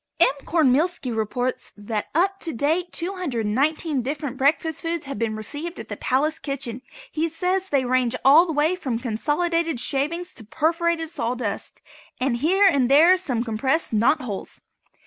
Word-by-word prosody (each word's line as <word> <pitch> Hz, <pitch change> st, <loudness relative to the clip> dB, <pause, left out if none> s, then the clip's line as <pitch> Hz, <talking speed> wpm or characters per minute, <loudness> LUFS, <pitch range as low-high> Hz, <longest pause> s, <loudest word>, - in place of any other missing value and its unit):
M. 340 Hz, -, +6 dB, 0.2 s
Cornmealski 300 Hz, -3 st, +1 dB
reports 245 Hz, +4 st, -2 dB
that 210 Hz, 0 st, -4 dB
up 385 Hz, +4 st, +2 dB
to 330 Hz, -, -4 dB
date 320 Hz, +8 st, 0 dB
219 300 Hz, -, -1 dB
different 280 Hz, +1 st, -4 dB
breakfast 295 Hz, +3 st, +1 dB
foods 335 Hz, -2 st, -2 dB
have 275 Hz, -1 st, -6 dB
been 225 Hz, -2 st, -1 dB
received 290 Hz, -, -5 dB
at -, -, -9 dB
the -, -, -4 dB
palace 300 Hz, +5 st, 0 dB
kitchen. 255 Hz, -4 st, -4 dB, 0.3 s
He 320 Hz, +1 st, 0 dB
says 365 Hz, +4 st, -1 dB
they 275 Hz, -3 st, +1 dB
range 250 Hz, -1 st, +1 dB
all 310 Hz, +6 st, +7 dB
the -, -, -2 dB
way 305 Hz, +4 st, +2 dB
from 265 Hz, -10 st, -3 dB
consolidated 295 Hz, +7 st, -1 dB
shavings 310 Hz, +8 st, -1 dB
to 225 Hz, -, -11 dB
perforated 325 Hz, -, 0 dB
sawdust, 245 Hz, -7 st, -4 dB, 0.4 s
with 255 Hz, 0 st, +1 dB
here 370 Hz, +10 st, +3 dB
and 275 Hz, -9 st, +3 dB
there 320 Hz, +7 st, +7 dB
some 255 Hz, -11 st, -2 dB
compressed 255 Hz, +6 st, -1 dB
knot 230 Hz, +8 st, +3 dB
holes. 210 Hz, -6 st, -6 dB
290 Hz, 155 wpm, -23 LUFS, 245-335 Hz, 0.4 s, all